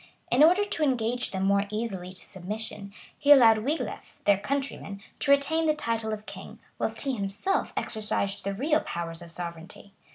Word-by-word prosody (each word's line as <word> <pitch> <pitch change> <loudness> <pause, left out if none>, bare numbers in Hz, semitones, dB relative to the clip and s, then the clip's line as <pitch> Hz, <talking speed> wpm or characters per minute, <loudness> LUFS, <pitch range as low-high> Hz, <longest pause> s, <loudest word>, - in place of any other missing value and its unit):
In 255 +5 +6
order 365 +6 +5
to 405 - -3
engage 245 -3 0
them 190 -1 -3
more 200 +1 +2
easily 205 -4 -4
to 185 - -8
submission, 200 +1 -6 0.3
he 285 - +4
allowed 230 -6 +8
Wiglef, 285 +9 -3
their 200 -1 +4
countryman, 270 -6 -3 0.2
to - - -2
retain 310 +4 +3
the 305 - +3
title 230 -6 -2
of 215 0 -5
king, - - -9 0.2
whilst - - -1
he 275 -2 -1
himself 200 - -1
exercised 210 -3 -2
the 200 0 -2
real 300 +8 +2
powers 165 0 -5
of 170 - -10
sovereignty. 170 +3 -8
220 Hz, 170 wpm, -27 LUFS, 195-280 Hz, 0.3 s, allowed